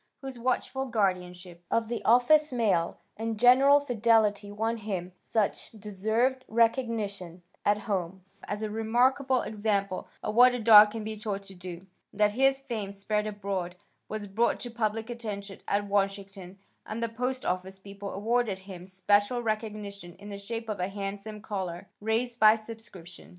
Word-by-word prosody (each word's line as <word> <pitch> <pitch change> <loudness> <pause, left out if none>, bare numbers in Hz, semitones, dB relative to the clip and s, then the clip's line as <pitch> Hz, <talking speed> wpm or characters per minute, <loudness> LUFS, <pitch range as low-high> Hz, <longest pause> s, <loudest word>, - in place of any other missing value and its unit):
whose 265 -2 -7
watchful 260 +2 -1
guardianship 180 -5 -2
of 230 -1 +1
the 235 +1 -4
office 280 +6 +5
mail 210 -9 +1 0.2
and 225 0 -3
general 265 +4 +7
fidelity 220 -5 +2
won 225 +3 -1
him 190 -5 -4
such 215 -3 -1
deserved 220 +5 -1
recognition 220 -7 0 0.2
at 205 0 +3
home 190 -3 -3 0.2
as 205 +1 -4
a 215 - -2
remarkable 250 +4 +2
example 205 -3 -1 0.2
of 210 - -2
what 245 +2 +6
a - - -3
dog 215 -2 +9
can 220 0 -6
be 220 0 -4
taught 205 -2 -4
to 195 0 -8
do, 180 0 -9 0.3
that 210 0 +2
his 270 +4 +3
fame 220 -7 -5
spread 210 +2 -2
abroad, 195 -4 -4 0.3
was 215 -1 -4
brought 215 +4 +1
to 240 - -6
public 225 -1 -2
attention 210 -5 -6
at 205 +1 0
Washington 195 -2 -2 0.3
and 225 +2 -5
the - - +1
post 250 +3 -3
office 185 +1 -2
people 200 +1 -8
awarded 220 0 0
him 190 -2 -10
special 205 +5 +1
recognition 210 -5 -4
in 205 +2 -11
the 200 -1 -6
shape 225 +3 -5
of 215 -3 -4
a 180 - 0
handsome 200 +2 -6
collar, 190 -3 -5
raised 230 +3 -1
by 215 0 +7
subscription. 215 -6 -11
210 Hz, 155 wpm, -28 LUFS, 195-230 Hz, 0.3 s, dog